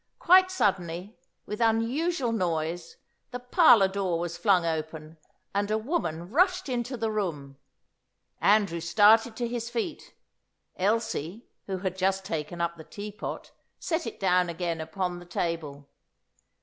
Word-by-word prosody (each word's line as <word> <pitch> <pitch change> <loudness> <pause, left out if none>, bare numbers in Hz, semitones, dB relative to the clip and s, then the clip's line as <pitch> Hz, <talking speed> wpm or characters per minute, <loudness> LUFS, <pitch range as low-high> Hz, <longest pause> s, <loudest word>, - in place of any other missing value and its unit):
Quite 370 +1 +6
suddenly, 190 - -1 0.3
with 210 +2 -5
unusual 240 +5 +1
noise, 170 -4 -2 0.3
the 250 - -5
parlour 245 - +5
door 190 -3 -1
was 170 0 -4
flung 180 -1 +3
open, 160 0 -4 0.3
and 200 +1 0
a 215 - +1
woman 200 - -3
rushed 365 - +2
into 250 0 -3
the 225 -1 -1
room. 150 -10 -4 0.8
Andrew 200 -5 +3
started 210 +7 +4
to 240 +1 -2
his 235 0 -4
feet. 240 +7 -5 0.6
Elsie, 215 - -1 0.2
who 190 -1 -2
had 185 -1 -3
just 190 0 0
taken 165 -1 -4
up 170 0 -1
the 160 - -10
teapot, 205 +4 -7 0.3
set 330 -1 -2
it - - -7
down 180 -2 +2
again 170 -1 -3
upon 175 +2 -3
the 175 - -12
table. 155 -5 -4
195 Hz, 135 wpm, -27 LUFS, 170-230 Hz, 0.8 s, Quite